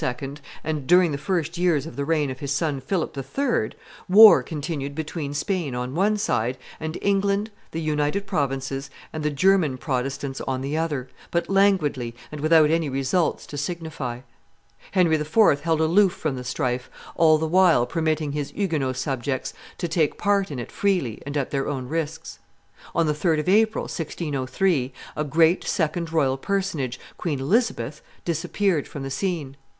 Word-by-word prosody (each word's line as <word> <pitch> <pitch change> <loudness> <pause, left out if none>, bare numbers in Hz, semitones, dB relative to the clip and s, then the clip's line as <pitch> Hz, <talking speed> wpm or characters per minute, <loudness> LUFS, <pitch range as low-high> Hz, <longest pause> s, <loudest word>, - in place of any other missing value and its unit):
and 150 -4 -3
during 180 0 +5
the - - -1
first 170 0 -2
years 170 -6 +2
of 165 - -8
the 140 - -2
reign 150 -2 +1
of 130 - -8
his 140 -1 -4
son 145 -2 0
Philip 170 -3 -2
III., 275 - -1 0.4
war 205 -6 +9
continued 145 0 -4
between 155 -1 -4
Spain 155 -4 -1
on 125 +1 -3
one 205 +6 +2
side, 125 - 0 0.2
and 160 +1 -4
England, 200 +2 +1 0.2
the 165 - -4
United 155 +5 0
Provinces, 135 -4 -2 0.2
and 155 - -4
the 150 - +1
German 155 -2 +3
Protestants 135 +1 -3
on 130 -1 -1
the 140 +3 -2
other, 150 -5 -1 0.2
but 170 +2 -1
languidly 155 -12 +2 0.2
and 150 -1 -6
without 155 -1 +5
any 165 -2 +1
results 135 +6 0
to 145 - -6
signify. 150 -6 -4 0.7
Henry 175 -4 +3
IV. 150 0 +3
held 165 0 +1
aloof 180 +4 +4
from 155 -7 -2
the 125 - -6
strife, 125 0 -2 0.3
all 155 -2 +5
the 160 - -1
while 170 -6 +4
permitting 155 -1 -1
his 145 -1 -3
Huguenot 155 -10 -1
subjects 130 -1 -2 0.2
to 175 - -2
take 160 -2 +1
part 200 -1 +1
in 145 - -5
it 120 - -6
freely 180 - 0
and 145 +1 -2
at 140 - -2
their 135 -1 -1
own 130 -3 -3
risks. 160 +1 -4 0.6
On 165 - +3
the 150 - +1
3d 155 +1 +1
of 155 - -10
April, 220 +3 +3
1603, 150 -2 -1 0.2
a 160 +4 +3
second 170 0 0
great 160 - -11
royal 135 -5 +2
personage, 155 -8 -2 0.2
Queen 150 -6 -2
Elizabeth, 220 - 0 0.2
disappeared 170 0 0
from 140 - -7
the 135 - -5
scene. 145 -2 -2
155 Hz, 165 wpm, -24 LUFS, 135-175 Hz, 0.7 s, war